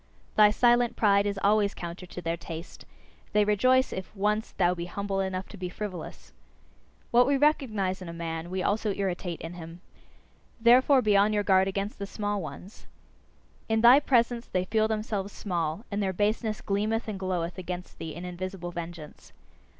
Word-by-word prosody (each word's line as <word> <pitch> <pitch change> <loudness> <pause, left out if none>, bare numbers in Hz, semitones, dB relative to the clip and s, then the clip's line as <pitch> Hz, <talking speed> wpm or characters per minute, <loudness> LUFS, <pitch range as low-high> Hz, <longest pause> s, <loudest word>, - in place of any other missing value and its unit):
Thy 210 -1 +7
silent 240 +2 +3
pride 200 -2 +3
is 200 -1 -2
always 205 0 +3
counter 175 +1 -7
to 180 - -8
their 165 0 -1
taste; 165 0 -9 0.5
they 210 0 +4
rejoice 255 +6 +3
if 190 +3 -7
once 210 +2 0
thou 180 -1 +2
be 170 -1 -5
humble 195 +2 -3
enough 190 -1 -2
to 210 - -10
be 180 -1 -4
frivolous. 180 -4 -7 0.8
What 245 +1 +5
we 280 0 +3
recognise 220 -11 +1
in 180 - -7
a - - -5
man, 165 0 -5
we 185 0 -2
also 210 -1 0
irritate 180 -3 -3
in 165 +2 -6
him. 165 0 -9 0.8
Therefore 255 +3 +5
be 210 -1 +3
on 205 +2 +4
your 205 -1 +1
guard 190 -1 +4
against 195 +2 -3
the 200 - -4
small 205 0 -2
ones! 165 +6 -10 0.8
In 220 0 +2
thy 245 +4 +8
presence 240 -4 +1
they 185 0 -1
feel 220 +2 +2
themselves 215 -2 -2
small, 170 +1 -3
and 205 +1 -1
their 190 -1 0
baseness 215 +2 -1
gleameth 215 +3 -1
and 205 -3 -4
gloweth 180 -2 -2
against 180 0 -7
thee 160 -2 -6
in 175 +2 -7
invisible 180 0 -5
vengeance. 170 -3 -9
200 Hz, 175 wpm, -28 LUFS, 180-215 Hz, 0.8 s, thy